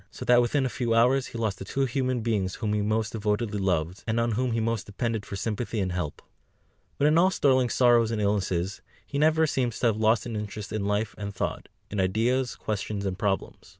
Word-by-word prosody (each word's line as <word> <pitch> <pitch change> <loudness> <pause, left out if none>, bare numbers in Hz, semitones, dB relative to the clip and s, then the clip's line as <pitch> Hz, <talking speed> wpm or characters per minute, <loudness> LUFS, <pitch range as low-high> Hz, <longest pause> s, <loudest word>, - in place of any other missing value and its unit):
So - - -8
that 125 0 +6
within 130 +3 +1
a - - 0
few 120 -3 +1
hours 125 +3 +3
he - - -8
lost 110 -4 -1
the - - -5
two 135 +7 -1
human 130 -1 -1
beings 105 -5 -1
whom 105 -2 -2
he 105 - +1
most 110 +2 0
devotedly 105 -1 -1
loved, 90 -1 -1
and 110 +1 +1
on 115 0 +1
whom 120 +2 0
he 115 - 0
most 115 -2 -1
depended 110 0 -3
for - - -5
sympathy 110 +3 -2
and 95 -2 -1
help. 90 -5 -4 0.7
But 145 - +2
in 155 +2 +5
all 185 +2 +5
Sterling's 130 -8 +2
sorrows 120 -3 +5
and 115 -2 -2
illnesses, 95 -2 -1 0.2
he 140 - -3
never 160 +1 +4
seems 125 -6 -1
to - - +1
have 110 -2 +3
lost 110 +1 +3
his 120 - -5
interest 105 -1 -5
in 105 -2 -1
life 105 +1 0
and 100 -1 -5
thought, - - -3 0.2
in 105 - -2
ideas, 120 +7 +1
questions, 105 -1 -3
and 95 -1 -1
problems. 100 -2 -2
110 Hz, 220 wpm, -27 LUFS, 100-120 Hz, 0.7 s, that